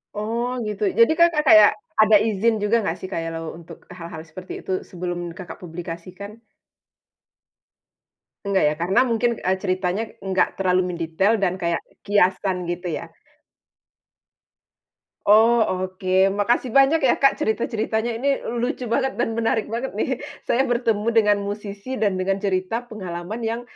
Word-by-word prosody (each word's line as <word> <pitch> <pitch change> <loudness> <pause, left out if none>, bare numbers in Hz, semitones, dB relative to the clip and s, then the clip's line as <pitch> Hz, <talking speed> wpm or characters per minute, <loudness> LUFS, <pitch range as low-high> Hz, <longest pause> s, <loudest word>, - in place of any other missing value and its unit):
Oh 230 +3 -2 0.2
gitu, 210 0 -4 0.2
jadi 230 - +7
Kakak 340 -2 +4
kayak 215 -1 +8 0.3
ada 215 0 +6
izin 220 0 +1
juga 210 +3 +2
enggak - - -2
sih, 185 - -6
kalau 165 0 -4
untuk 170 -1 -12
e - - -10
hal-hal 165 -2 -8
seperti 185 +3 -9
itu, - - -6 0.2
sebelum 175 -1 -5
Kakak 175 +1 -9
publikasikan? 180 +4 -8 2.1
Enggak 195 -1 +2
ya, 150 - +1
karena 190 +6 +2
mungkin, 230 +1 +2 0.2
eee, 185 - +2
ceritanya 185 +2 -1 0.2
enggak 190 -1 +2
terlalu 185 -1 +2
mendetail 170 +4 0
dan 180 - +2
kayak 170 -1 0 0.3
kiasan, 190 -1 +2
gitu 175 +1 -5
ya? - - -8 2.2
Oh 225 +3 +6 0.2
oke, 185 0 +1
makasih 235 +4 0
banyak 275 +4 +5
ya, 265 -5 +3
Kak, 275 - +3
cerita-ceritanya, 220 +1 -1
ini 275 +2 0 0.2
lucu 245 -1 -3
banget 265 +2 0
dan 225 - -1
menarik 225 -1 0
banget 235 -1 -4
nih. 260 +4 -1 0.2
Saya 265 +3 +1
bertemu 230 -3 0
dengan 210 -2 +4
musisi 205 +4 -5
dan 200 -5 0
dengan 195 +2 -1
cerita 195 +4 -1
pengalaman 185 0 -6
yang, 230 +1 -2
205 Hz, 140 wpm, -22 LUFS, 185-230 Hz, 2.2 s, kayak